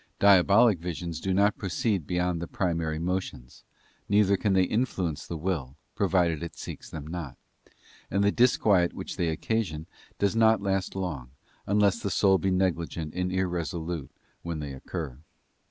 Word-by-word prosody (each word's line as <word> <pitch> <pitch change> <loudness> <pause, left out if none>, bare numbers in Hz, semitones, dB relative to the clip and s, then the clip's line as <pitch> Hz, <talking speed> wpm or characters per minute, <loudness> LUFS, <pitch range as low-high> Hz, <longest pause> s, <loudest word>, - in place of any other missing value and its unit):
Diabolic 100 +1 +5
visions 85 -1 -4
do 95 - -1
not 100 +2 +2
proceed 95 -2 -1
beyond 90 -1 0
the 85 - -4
primary 85 -4 -1
motions, 85 -8 -4 0.5
neither 100 -1 +4
can 100 +1 0
they 95 -1 +4
influence 90 - -1
the 85 - -4
will, 75 -6 -3 0.2
provided 85 -5 +1
it 85 - -6
seeks - - -8
them 75 -2 -7
not; 80 -5 -6 0.7
and 100 +1 +1
the 100 - +4
disquiet 105 -7 +3
which - - -6
they 85 - 0
occasion 80 -2 -2 0.3
does 100 +1 +1
not 110 0 +5
last 95 -1 -1
long, 80 -10 -4 0.4
unless 100 +2 +3
the 100 - -2
soul 95 0 +3
be 95 - 0
negligent 85 -4 -1
and 90 0 -1
irresolute 85 -3 -2 0.3
when 85 -1 -4
they 75 -2 -5
occur. 70 -1 -6
90 Hz, 155 wpm, -27 LUFS, 80-100 Hz, 0.7 s, Diabolic